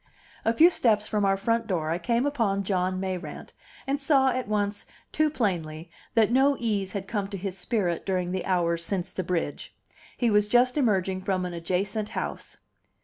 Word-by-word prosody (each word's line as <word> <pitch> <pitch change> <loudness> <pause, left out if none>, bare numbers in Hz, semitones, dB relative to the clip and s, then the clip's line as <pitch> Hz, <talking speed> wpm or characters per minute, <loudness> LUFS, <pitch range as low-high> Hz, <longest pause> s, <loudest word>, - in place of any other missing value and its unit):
A 225 - +3
few 325 +10 +6
steps 215 -9 +2
from 210 -2 0
our 195 0 +3
front 230 +3 0
door 160 -5 -1
I 170 - -1
came 235 +6 +1
upon 225 -9 0
John 185 -1 0
Mayrant, 185 -1 -5 0.3
and 280 +1 -1
saw 275 -2 +4
at 255 -2 -2
once 205 -1 -1 0.2
too 310 0 +2
plainly 170 - -2 0.2
that 225 -1 +4
no 275 +3 +4
ease 205 -5 -1
had 195 -2 -4
come 205 -2 -2
to 200 0 -6
his 190 0 -4
spirit 180 -2 -1
during 180 -2 -1
the 185 0 -2
hours 170 -2 +1
since 180 0 -1
the - - -3
bridge. 170 -4 -3 0.4
He 240 -3 +2
was 210 0 +3
just 245 +3 +3
emerging 195 -8 +1
from 185 -1 -1
an 180 - -5
adjacent 195 +5 -2
house. - - -5
200 Hz, 185 wpm, -26 LUFS, 185-230 Hz, 0.4 s, few